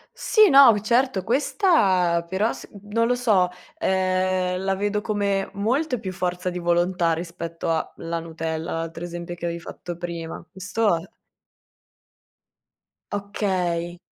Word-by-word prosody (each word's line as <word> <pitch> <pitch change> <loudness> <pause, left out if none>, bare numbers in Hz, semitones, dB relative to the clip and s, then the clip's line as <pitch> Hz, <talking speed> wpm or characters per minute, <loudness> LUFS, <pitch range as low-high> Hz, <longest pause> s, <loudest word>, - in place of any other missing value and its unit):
Sì, 430 -3 +5
no, 275 -3 +9
v 205 - -1
certo, 235 -2 +1
questa 195 - +2
però 200 +5 +1
s - - -10 0.2
non 230 +2 +2
lo 245 - +2
so, 210 -7 +3 0.3
ehm, 185 -1 +1
la 195 0 +1
vedo 205 +1 -1
come 200 -2 0
molta 250 +6 0
più 190 -2 -5
forza 180 0 -2
di 180 - -5
volontà 175 0 +1
rispetto 165 0 -4
a 160 -1 -1
la 165 0 -3
nutella, 165 0 -4
l'altro 165 +1 -4
esempio 175 0 -6
che 175 - -9
avevi 170 0 -3
fatto 175 0 -8
prima. 170 -1 -6
Questo 195 0 0
è 170 +5 -9 2.0
Okay. 180 -4 -2
185 Hz, 135 wpm, -24 LUFS, 170-205 Hz, 2.0 s, no